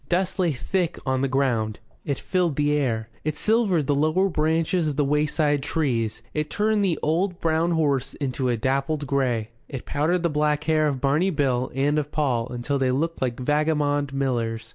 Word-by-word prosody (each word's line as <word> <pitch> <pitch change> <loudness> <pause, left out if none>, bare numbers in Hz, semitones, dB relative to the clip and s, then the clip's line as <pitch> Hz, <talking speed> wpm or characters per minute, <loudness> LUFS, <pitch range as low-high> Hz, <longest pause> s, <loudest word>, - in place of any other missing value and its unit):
Dust 185 +2 0
lay 175 -3 +3
thick 175 +6 -1
on 130 -1 0
the 135 - +2
ground, 120 -5 0 0.3
it 140 -3 -2
filled 180 -5 0
the 145 +1 +1
air, 115 -6 0
it 155 0 -2
silvered 210 -8 +2
the 145 - +1
lower 155 +7 +2
branches 160 +1 +1
of 150 - -2
the 145 0 +1
wayside 150 0 +1
trees, 120 -7 -1
it 150 0 -2
turned 210 +5 +1
the 180 -5 +1
old 175 +4 0
brown 165 +1 +1
horse 145 -6 0
into 130 -2 -2
a 120 - +1
dappled 140 +5 -1
grey, 125 -5 0 0.2
it 135 -3 -6
powdered 165 +5 0
the - - +3
black 150 -1 0
hair 155 -1 +2
of 135 -3 -2
Barney 150 +7 +2
Bill 135 -6 0
and 145 +3 +2
of 150 0 -4
Paul 125 -6 0
until 125 +3 -2
they 130 -1 +2
looked 160 +6 -1
like 125 -2 -1
vagabond 145 0 +1
millers. 115 -5 -2
145 Hz, 185 wpm, -24 LUFS, 130-160 Hz, 0.3 s, lay